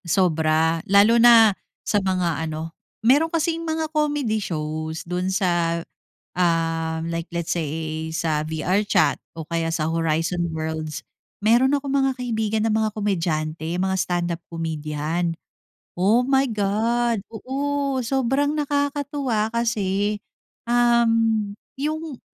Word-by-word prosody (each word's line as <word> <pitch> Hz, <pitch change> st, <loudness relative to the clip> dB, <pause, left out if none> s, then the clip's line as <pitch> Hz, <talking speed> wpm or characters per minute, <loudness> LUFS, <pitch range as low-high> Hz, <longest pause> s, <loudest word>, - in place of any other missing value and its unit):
Sobra. 160 Hz, -2 st, +2 dB
Lalo 210 Hz, +4 st, +6 dB
na 230 Hz, -3 st, +8 dB, 0.3 s
sa 205 Hz, -, +1 dB
mga 180 Hz, -5 st, 0 dB
ano, 160 Hz, +1 st, -5 dB, 0.3 s
meron 290 Hz, +7 st, +5 dB
kasing 330 Hz, 0 st, 0 dB
mga 320 Hz, -1 st, -2 dB
comedy 290 Hz, -8 st, 0 dB
shows 155 Hz, -2 st, -4 dB
dun 180 Hz, +2 st, -2 dB
sa, 175 Hz, -3 st, +1 dB, 0.6 s
ah, 165 Hz, -2 st, 0 dB
like 165 Hz, 0 st, -4 dB
let's 170 Hz, 0 st, -2 dB
say 160 Hz, 0 st, -3 dB
sa 160 Hz, -2 st, 0 dB
VR 160 Hz, +6 st, 0 dB
chat -, -, +3 dB, 0.2 s
o 160 Hz, -1 st, -7 dB
kaya 165 Hz, -1 st, -1 dB
sa 155 Hz, -1 st, 0 dB
Horizon 165 Hz, +1 st, 0 dB
Worlds. 155 Hz, -1 st, -4 dB, 0.4 s
Meron 240 Hz, +5 st, +4 dB
akong 280 Hz, -1 st, -2 dB
mga 270 Hz, -1 st, +2 dB
kaibigan 220 Hz, -3 st, -1 dB
na -, -, +1 dB
mga 220 Hz, 0 st, +1 dB
komedyante, 165 Hz, -6 st, -1 dB
mga 190 Hz, 0 st, 0 dB
stand-up 175 Hz, -1 st, -1 dB
comedian. 160 Hz, +1 st, -2 dB, 0.6 s
Oh 210 Hz, +7 st, +3 dB
my 270 Hz, +1 st, +2 dB
God. 225 Hz, +2 st, 0 dB
Oo, 275 Hz, +3 st, -2 dB
sobrang 270 Hz, +3 st, +1 dB
nakakatuwa 285 Hz, -5 st, -1 dB
kasi, 210 Hz, -3 st, 0 dB, 0.5 s
um, 230 Hz, -3 st, +3 dB, 0.2 s
yung 305 Hz, 0 st, -4 dB
195 Hz, 120 wpm, -23 LUFS, 165-240 Hz, 0.6 s, na